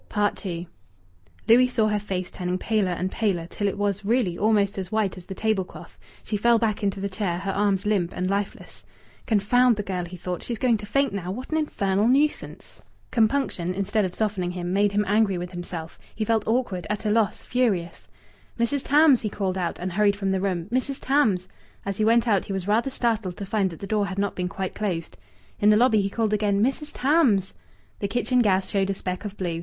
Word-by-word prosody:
II 175 -1 -4 0.8
Louis 250 +3 +6
saw 230 -4 +1
her 210 0 +1
face 185 -3 -4
turning 180 0 -2
paler 210 -1 0
and 185 +2 -2
paler, 190 -7 0
till 205 +4 -3
it 200 - -2
was, 200 0 -1
really, 210 -4 +1
almost 205 0 +2
as 185 -1 -6
white 215 -3 0
as 180 -2 -11
the 190 - -7
table 215 -3 +1
cloth. - - -13 0.2
She 210 - -2
fell 235 +3 +4
back 220 -2 0
into 200 -1 -1
the 200 - -2
chair, 185 -3 -2
her 195 +2 -3
arms 200 0 +1
limp 195 -5 +1
and 185 - -1
lifeless. 200 +1 -4 0.4
"Confound 240 +3 +4
the 210 - -3
girl!" 185 -3 -3
he 180 +1 -9
thought. 180 0 -4
"She's 235 - -4
going 240 -2 +2
to 205 0 -9
faint 275 0 +1
now! 185 -3 -4
What 250 +10 -6
an 315 - +1
infernal 205 -9 +1
nuisance!" 285 +4 0 0.3
Compunction, 220 -7 +1
instead 200 +2 0
of 185 -2 -2
softening 200 -5 -1
him, 180 0 -4
made 205 +1 +3
him 205 +1 +1
angry 205 -2 +2
with 175 +1 -5
himself. 175 -2 -7 0.2
He 220 - -2
felt 225 -1 +1
awkward, 220 -7 -1
at 210 +1 -3
a 210 - +2
loss, 220 -1 +1
furious. 200 -9 -1 0.5
"Mrs. 250 +4 +1
Tams!" 290 -3 +5
he 215 - -2
called 195 -2 -2
out, 180 -3 -2
and 185 +1 -4
hurried 205 +1 +3
from 195 -1 -1
the 190 -1 0
room. 180 -4 -1
"Mrs. 260 +2 -1
Tams!" 220 -10 +2 0.4
As 200 -1 -3
he 215 - +2
went 230 +1 +4
out 200 -4 +2
he 195 - -4
was 190 -1 -3
rather 225 +5 +2
startled 225 -8 -1
to 200 - -5
find 195 -1 0
that 165 - -9
the 200 - -7
door 210 -1 0
had 195 0 -6
not 200 0 0
been 180 0 -2
quite 190 0 -4
closed. 170 - -3 0.4
In 205 - +4
the 210 - +6
lobby 225 -3 +4
he 195 - -1
called 220 0 -1
again, 205 -1 +2
"Mrs. 275 +4 -1
Tams!" 255 - +2 0.5
The 200 - -1
kitchen 245 +3 +1
gas 190 -4 +2
showed 195 -1 0
a 195 - 0
speck 185 +2 -5
of 205 0 -6
blue. 170 -3 -2
200 Hz, 220 wpm, -25 LUFS, 185-225 Hz, 0.8 s, Louis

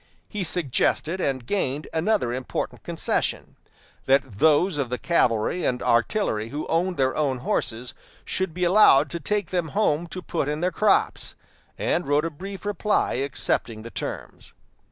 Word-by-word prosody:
He 210 -3 -4
suggested 170 +2 0
and 130 -5 -1
gained 145 -4 -1
another 165 - +1
important 130 0 -4
concession - - -1 0.5
that 135 -6 +2
those 160 +2 +4
of 135 -4 -1
the 125 - -2
cavalry 125 0 +1
and 125 - 0
artillery 115 - +1
who 145 +4 -4
owned 175 +2 0
their 130 -1 +1
own 140 -4 0
horses 120 -1 -2 0.3
should 190 -2 -1
be 180 +3 -3
allowed 175 -7 +6
to 170 - -3
take 205 +7 -1
them 175 -3 0
home 170 -5 +2
to 185 +2 -6
put 160 -4 -2
in 150 +1 -2
their 180 +2 0
crops; 210 +3 +1 0.4
and 175 - 0
wrote 145 +2 +2
a 165 - -2
brief 195 +5 -8
reply 205 +1 0
accepting 125 -4 -1
the 115 - -9
terms. - - -6
155 Hz, 155 wpm, -24 LUFS, 130-180 Hz, 0.5 s, allowed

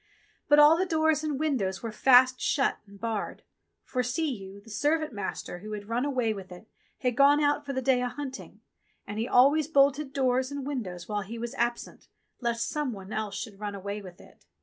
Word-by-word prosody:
But 295 - +7
all 295 +2 +8
the 370 - +1
doors 315 -2 +2
and 295 -3 -2
windows 225 -12 -1
were 230 - -3
fast 255 +2 +5
shut 275 - +1
and 200 0 -15
barred, 225 -2 -4 0.4
for, 255 - -2
see 265 +6 -1
you, 195 -2 -9
the 220 +2 -15
servant 300 +6 0
master 190 -3 -5
who 215 +3 -7
had 205 -1 -6
run 240 +3 0
away 250 -6 0
with 190 -3 -9
it 180 +5 -12 0.3
had 250 -3 0
gone 285 +1 +6
out 290 0 +1
for 275 - -2
the 260 0 -2
day 255 -1 +3
a 250 - -1
hunting, 270 -1 -8 0.4
and 205 +1 -5
he 230 - -1
always 280 +5 +4
bolted 280 -1 +3
doors 260 -1 +1
and 285 -2 -5
windows 195 -11 -5
while 210 -1 -2
he 215 +4 -7
was 235 +2 -5
absent 240 -2 -3 0.3
lest 235 -1 -1
some 295 -5 -2
one 195 0 -9
else 210 -2 -3
should 205 -4 -7
run 205 -1 -4
away 200 +1 -5
with 185 -2 -12
it. - - -18
250 Hz, 210 wpm, -28 LUFS, 210-285 Hz, 0.4 s, all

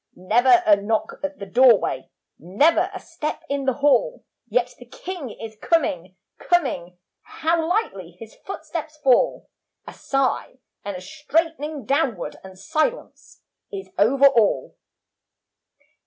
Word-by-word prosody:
Never 240 +7 +4
a 210 - +7
knock 215 +2 -2
at 290 0 -4
the 200 - -7
doorway, 225 - +3 0.3
Never 300 - +2
a 380 - -7
step 310 -2 -5
in 280 -1 -2
the 265 - +2
hall, - - +2 0.2
Yet 245 +2 0
the 245 - -13
King 340 +1 -7
is 220 0 -9
coming, 185 - 0 0.2
coming, 215 - 0 0.2
How 325 0 -1
lightly 195 - -2
his 225 -1 -11
footsteps 315 -4 -6
fall. 255 -2 +3 0.4
A - - -10
sigh, 270 -2 -1 0.3
and 200 -2 -5
a - - -9
straightening 305 - -2
downward 270 - -1
And 190 -1 -12
silence 315 - -3 0.3
is 195 -1 -7
over 265 +7 +4
all. 230 -6 +3
265 Hz, 125 wpm, -23 LUFS, 205-315 Hz, 0.4 s, a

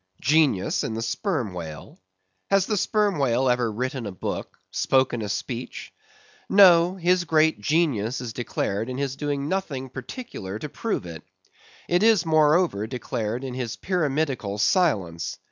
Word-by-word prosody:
Genius 145 -9 +2
in 110 - -3
the 115 - -3
Sperm 125 - -2
Whale? 80 -4 -8 0.5
Has 195 -1 +3
the 215 - -1
Sperm 205 -2 +1
Whale 130 -1 +2
ever 125 -2 +2
written 125 +1 -3
a - - -5
book, 90 - -5
spoken 130 -3 +1
a 105 - -4
speech? 120 +3 -5 0.6
No, 180 -2 +6
his 180 0 +2
great 160 -6 +2
genius 130 -5 +1
is 120 -3 -6
declared 110 -1 -2
in 130 - -4
his 135 -1 -2
doing 145 -1 -2
nothing 145 -8 -3
particular 130 - -7
to 150 +7 -6
prove 220 - -3
it. 85 -2 -8 0.7
It 175 +1 +2
is 215 -6 +4
moreover 155 - +3
declared 120 -1 -3
in 130 -2 -5
his 125 -3 -4
pyramidical 145 - -1
silence. 105 - +1
135 Hz, 145 wpm, -25 LUFS, 115-170 Hz, 0.7 s, No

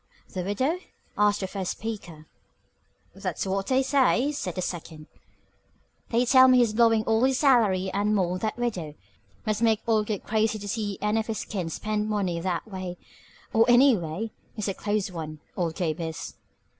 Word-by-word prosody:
"The 185 - -2
widow?" 260 - 0 0.4
asked 205 0 +2
the 190 - -2
first 190 -2 -3
speaker. 175 -8 -7 0.9
"That's - - -3
what 195 0 -1
they 265 0 +3
say," 270 0 +3
said 185 - -4
the 185 - -2
second. 160 -3 -6 1.0
"They 240 +1 +2
tell 260 +1 +7
me 255 -1 +6
he's 235 -3 +3
blowing 225 -1 +4
all 225 +2 +2
his 265 0 +3
salary 210 -10 +3
and 205 +2 +1
more 185 -3 +1
on 185 - -2
that 215 +4 -2
widow. 185 -11 -3 0.5
Must 215 0 -1
make 225 -2 +3
old 215 -2 +2
Gabe 210 -3 -3
crazy 220 0 +1
to 205 -1 -7
see 205 -2 -2
any 210 +2 +1
of 220 - -3
his 220 -1 -3
kin 185 -5 -3
spend 215 +4 -2
money 190 -5 -1
that 175 +3 -2
way. 185 -3 -6 0.6
Or 225 - +6
any 250 +1 +7
way. 180 +5 -4 0.2
He's 215 -2 -3
a 195 - 0
close 205 0 -2
one, 155 -3 -6 0.2
old 170 -3 -1
Gabe 170 -3 -2
is." 160 -1 -5
210 Hz, 180 wpm, -26 LUFS, 185-225 Hz, 1.0 s, tell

